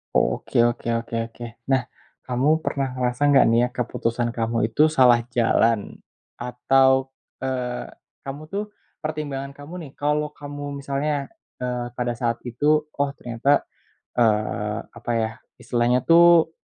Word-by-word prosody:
Oke - - +1
oke 120 0 -3
oke 115 0 -7 0.2
oke 120 - -8 0.3
nah 130 -1 +2 0.4
kamu 140 +6 +2
pernah 135 -4 -2
ngerasa 125 +3 +1
gak 140 - +6
nih 115 +1 +4
ya 125 - +1
keputusan 120 -1 -1
kamu 115 0 -1
itu 150 +7 +4
salah 125 -4 +6 0.2
jalan? 115 -2 +2 0.4
Atau, 130 +2 +2 0.3
eee, 125 -2 -2 0.4
kamu 140 +2 -6
tuh 205 +1 -1 0.4
pertimbangan 145 -3 -4
kamu 145 +4 -11
nih - - -14
kalau 150 +1 0
kamu 145 -1 -6
misalnya, 140 +1 -2 0.4
eee, 125 -1 -2
pada 120 -1 -1
saat 115 -1 -1
itu 150 +5 +2
oh 145 0 0
ternyata, 125 +4 +1 0.6
eee, 105 -2 +1 0.2
apa 120 - -4
ya 110 -1 0 0.3
istilahnya 120 +1 +1
tuh 170 -1 +7
130 Hz, 135 wpm, -23 LUFS, 120-145 Hz, 0.6 s, tuh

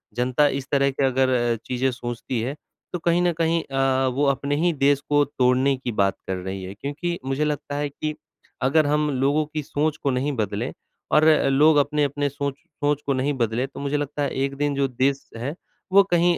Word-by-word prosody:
जनता 125 +4 +2
इस 135 -1 -3
तरह 140 -1 +3
की 135 - -2
अगर 130 -2 +2
चीजें 130 +1 0
सोचती 120 0 -4
है, 130 +5 -3 0.4
तो 180 - -2
कहीं 170 +1 +2
न 175 0 +3
कहीं 165 0 +1
अ, 135 -1 +1
वो 130 +3 +1
अपने 140 +1 0
ही 170 +4 +2
देश 140 -1 +3
को 145 0 +4
तोड़ने 130 +2 +2
की 125 -2 -4
बात 100 -3 +1
कर 95 - -1
रही 95 +1 -5
है, 95 +1 -6
क्योंकि 145 - -4
मुझे 135 +3 0
लगता 145 -1 -3
है 145 0 -1
कि 155 +2 -4 0.5
अगर 150 +4 +3
हम 150 +1 +1
लोगों 145 +3 +2
की 155 +1 -4
सोच 150 +2 -1
को 140 - +2
नहीं 130 +3 0
बदलें, 110 +2 -2 0.4
और 155 - +5 0.2
लोग 150 +3 +5
अपने-अपने 145 0 +1
सोच 140 0 -3 0.3
सोच 145 0 +1
को 140 - +1
नहीं 135 +2 0
बदले, 120 -1 0
तो 135 - -11
मुझे 140 +1 -1
लगता 145 0 -3
है 140 - 0 0.2
एक 140 0 -5
दिन 145 0 0
जो 140 0 +1
देश 135 +2 -1
है 130 +6 -3 0.4
वो 200 +1 +8
कहीं 175 0 +3
140 Hz, 205 wpm, -23 LUFS, 130-150 Hz, 0.5 s, वो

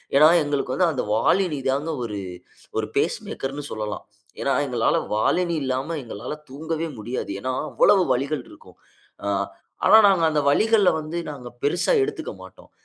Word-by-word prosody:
ஏன்னா 150 +2 +8 0.2
எங்களுக்கு 145 -3 -1
வந்து 180 - +3
அந்த 135 - -2
வாலினி 155 - +2
தான் 140 +4 0 0.2
1 105 -3 -4 0.6
1 - - -2
பேஸ் - - +1
மேக்கர்னு 135 +2 -5
சொல்லலாம். 105 -1 -4 0.4
ஏன்னா 135 - +1
எங்களால 120 -3 +1 0.2
Volini 170 +10 +1
இல்லாம 135 +5 -2
எங்களால 115 +3 -6 0.2
தூங்கவே 160 +3 -3
முடியாது. 120 0 -4
ஏன்னா 130 0 -2 0.2
அவ்வளவு 195 -2 +5
வலிகள் 135 +2 -2
இருக்கும். - - -17 0.5
ஆ - - -1 0.6
ஆனா 220 - +8
நாங்க 180 -4 +3
அந்த 150 -1 +1
வலிகள 215 +3 +4
வந்து 155 +3 -4
நாங்க 130 -4 -9 0.2
பெரிசா 175 - +2
எடுத்துக்க 405 - -4
மாட்டோம். - - -15
145 Hz, 150 wpm, -23 LUFS, 130-170 Hz, 0.6 s, ஏன்னா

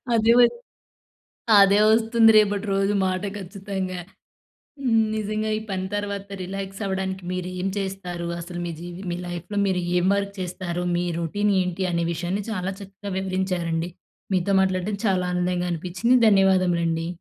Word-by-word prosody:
అదే 225 +1 +5
వోచ్ 245 - +5 1.1
అదే 200 +1 +5
వస్తుంది 225 0 +5
రేపటి 205 0 +3
రోజు 195 +1 +1
మాట 185 +1 -1
ఖచ్చితంగా. 190 -1 -5 0.8
హ్మ్. 225 -4 +3
నిజంగా 215 0 -2
ఈ - - -2
పని 190 -1 -2
తర్వాత 200 -1 -3 0.2
రిలాక్స్ 195 +2 -6
అవ్వడానికి 190 -1 -3
మీరు 180 0 -3
ఏం 185 - -1
చేస్తారు? 185 -3 -4
అసలు 175 +1 -6
మీ 170 - -3
జీవి 175 +2 -8
మీ 175 - -2
లైఫ్‌లో 175 +4 -5
మీరు 185 -2 0 0.2
ఏం 180 +1 +2
వర్క్ 200 0 -2
చేస్తారు? 180 -1 -3
మీ 175 - 0
రొటీన్ 205 +5 0
ఏంటి, 180 +1 -2
అనే 170 0 0
విషయాన్ని 175 +5 -2
చాలా 190 -2 -2
చక్కగా 200 0 -8
వివరించారండి. 180 -3 -1 0.4
మీతో 185 +1 +1
మాట్లాడడం 190 +2 0
చాలా 185 -2 +2
ఆనందంగా 180 0 0
అనిపించింది. 185 +9 +1
ధన్యవాదములండి. 180 -5 +3
190 Hz, 145 wpm, -24 LUFS, 180-200 Hz, 1.1 s, అదే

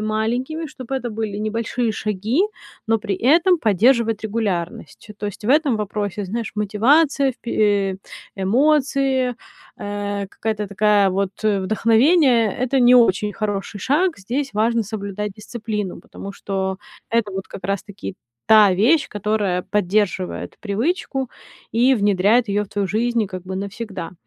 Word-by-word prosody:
маленькими, 235 +9 -2
чтобы 265 -2 -7
это 250 -2 -4
были 215 -2 -4
небольшие 225 +2 -1
шаги, 215 - -1 0.5
но 225 0 +2
при 205 -2 -3
этом 335 - +4
поддерживать 225 - +2
регулярность. 205 -4 -3
То 210 - -3
есть 205 +1 -7
в - - -2
этом 290 -4 +3
вопросе, 205 -1 -3
знаешь, 225 +4 -4
мотивация, 270 +8 +3
впе 235 -1 -7 0.4
э, - - -7 0.4
эмоции, 265 +3 +2 0.4
э, 205 0 -4
какая-то 210 -1 -3
такая 205 0 +3
вот 195 0 -1
вдохновение- 225 - +3
это 260 +1 +1
не 245 0 +6
очень 210 -4 +4
хороший 205 -1 -3
шаг. 320 - +1
Здесь 255 +6 -3
важно 230 +2 +2
соблюдать 205 -1 -5
дисциплину, 210 -2 -5
потому 200 - -9
что 190 -1 -3 0.3
это 230 -3 +1
вот 190 0 -5
как 185 - -10
раз-таки 195 - -4 0.3
та 215 -2 +7
вещь, 245 - +3
которая 205 -3 -1
поддерживает 200 -1 -1
привычку 265 - -2 0.4
и 245 +4 +4
внедряет 205 +2 +3
её 205 +1 0
в 195 - -18
твою 200 -2 -2
жизнь 235 +4 0
и - - -2
как 185 -2 -7
бы 190 0 -6
навсегда. 200 -3 -6
215 Hz, 140 wpm, -21 LUFS, 200-245 Hz, 0.5 s, та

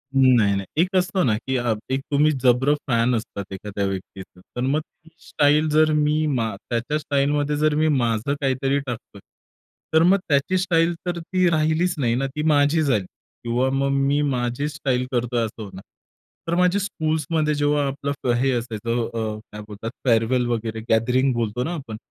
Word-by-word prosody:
नाही, 125 -6 +5
नाही 100 - -3 0.2
एक 185 +2 -1
असतं 185 -1 +1
ना, 110 -4 +2
की 130 - 0
अ, 120 -2 0 0.2
एक 135 - +1
तुम्ही 150 +2 +4
जबरा 130 +3 +4
फॅन 120 0 +2
असतात 100 -3 -6
एखाद्या 100 +1 -4
व्यक्तीचं. 95 -1 -7
तर 125 - -3
मग 135 +4 +1
ती 165 +1 -23 0.2
स्टाईल 150 +2 +3
जर 155 +1 +4
मी 150 +1 +2
मा 115 -7 -1
त्याच्या 120 +5 -1
स्टाईलमध्ये 145 0 0
जर 155 0 +2
मी 155 +1 +2
माझं 120 -2 +1
काहीतरी 135 +1 +1
टाकतोय. 120 -6 -7 0.7
तर 160 - +5
मग 190 +3 +5
त्याची 145 +6 +2
स्टाईल 175 -2 +2
तर 175 -1 -2
ती 180 +2 0
राहिलीच 160 +3 +1
नाही 120 -5 +1
ना? 135 +2 0
ती 150 +3 -5
माझी 150 +1 +3
झाली 110 -10 +1 0.4
किंवा 120 +3 0
मग 135 +1 0 0.2
मी 145 +1 +2
माझी 130 0 -1
स्टाईल 130 -4 -1
करतोय 120 -1 0
असं 110 0 -8
होणार. 95 -2 -10 0.7
तर 170 - 0
माझी 180 +2 +3
स्कूल्समध्ये 160 -5 -1
जेव्हा 145 0 +1
आपलं 140 +1 -3
फ - - -2
हे 135 0 +2
असायचं 115 0 -2
अ, 115 - -4 0.2
अ, - - -9
काय 105 0 -8
बोलतात 105 +2 -6 0.2
फेअरवेल 120 +2 +2
वगैरे 115 -1 -2
गॅदरिंग 125 +4 +2
बोलतो 120 0 -2
ना 165 - -3
आपण. 130 -10 -6
135 Hz, 180 wpm, -23 LUFS, 115-150 Hz, 0.7 s, नाही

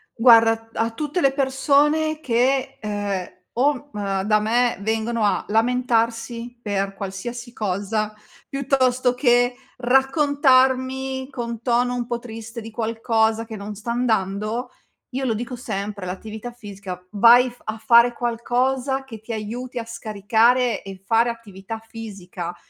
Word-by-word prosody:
Guarda. 230 -1 +7
A - - -5
t 225 - -24
a 230 0 +1
tutte 300 +8 -2
le 275 -3 +3
persone 290 +3 +2
che 260 0 +1
ehm 205 -4 -4
o 280 +2 +1
mh 195 -2 -2
da 215 0 +4
me 235 +3 +1
vengono 220 +2 -1
a 205 - +1
lamentarsi 235 +1 0
per 200 -3 -2
qualsiasi 235 +6 -6
cosa 210 +1 -1 0.4
piuttosto 255 -2 +1
che 245 -1 +3 0.2
raccontarmi 265 -1 +2
con 235 -4 -5
tono 245 0 +1
un 245 -1 -3
po' 240 - -1
triste 230 0 -8
di 225 +1 -9
qualcosa 225 0 0
che 225 -1 -8
non 205 0 -7
sta 220 +3 -5
andando, 220 -1 -1 0.4
io 265 0 -3
lo 235 - +1
dico 240 +3 -4
sempre, 205 -4 -4
l'attività 215 +5 -6
fisica, 200 -6 -8
vai 235 +4 +6
f 245 - -21
a 215 +1 -3
fare 235 +1 +5
qualcosa 250 +3 0
che 235 -5 -10
ti 220 - -8
aiuti 235 +4 -5
a 230 - -3
scaricare 230 +2 +1
e 195 -1 -10
fare 230 +3 +3
attività 225 -2 -7
fisica. 200 -6 -7
235 Hz, 140 wpm, -22 LUFS, 215-250 Hz, 0.4 s, Guarda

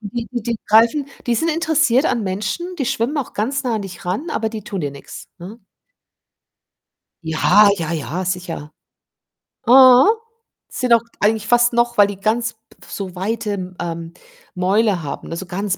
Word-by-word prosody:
Die 230 +2 -5
Die 235 -1 -2
greifen 230 +7 +4 0.2
die 240 - +2
sind 325 +8 0
interessiert 310 -4 +2
an 230 -8 0
Menschen, 205 - -3
die 270 - -2
schwimmen 240 +6 -1
auch 280 - -3
ganz 270 +7 -1
nah 240 -3 -1
an 210 - -4
dich 185 -3 -10
ran, 205 - -3
aber 220 -5 -1
die 220 -2 -8
tun 195 -3 -5
dir 145 - -2
nix, 140 0 -11
ne? 200 +6 -11 1.6
Ja, 180 +6 +4
ja, 165 -1 -3
ja, 165 +4 -3
sicher. 180 -4 -4 0.9
Mhm. 255 +1 +8 0.6
Sind 250 -2 +1
auch 230 - +5 0.2
eigentlich 210 0 +1
fast 240 +1 +3
noch 235 0 +1
weil 205 -1 +6
die 200 -1 -6
ganz 230 +3 0
p 225 0 -27
so 190 -3 -6
weite 210 +3 -3
M 185 -2 -6
ähm, 165 -1 -5 0.4
Mäuler 190 0 +1
haben, 140 - -6
ne, 165 - -5
so 190 - -6
ganz 190 +1 -3
215 Hz, 170 wpm, -19 LUFS, 185-240 Hz, 1.6 s, Mhm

